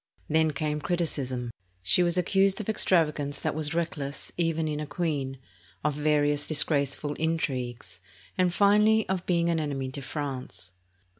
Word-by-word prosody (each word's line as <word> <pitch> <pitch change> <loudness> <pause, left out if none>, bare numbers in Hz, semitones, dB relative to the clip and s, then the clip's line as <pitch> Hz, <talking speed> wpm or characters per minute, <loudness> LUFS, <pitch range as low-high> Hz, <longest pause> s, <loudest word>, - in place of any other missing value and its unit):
Then 160 +1 +3
came 150 0 -2
criticism. 135 -8 -2 0.3
She 95 - +4
was 175 0 +1
accused 195 +2 +3
of 215 - -4
extrava 180 -7 +2
gance 145 -1 -3
that - - -1
was 155 +1 -1
reckless 150 -4 -3
even 165 -2 0
in 150 -1 -2
a 150 - -4
queen, 145 -5 -2 0.5
of 150 0 +1
various 145 0 +1
disgrace 140 -3 +2
ful 145 -1 -4
intrigues, 135 -7 -2 0.3
and 180 -1 +2
finally 210 +3 +4
of 185 -1 -2
being 170 -2 +2
an 165 - +1
enemy 135 -4 -3
to 140 - -6
France. 135 - -6
150 Hz, 155 wpm, -28 LUFS, 140-170 Hz, 0.5 s, She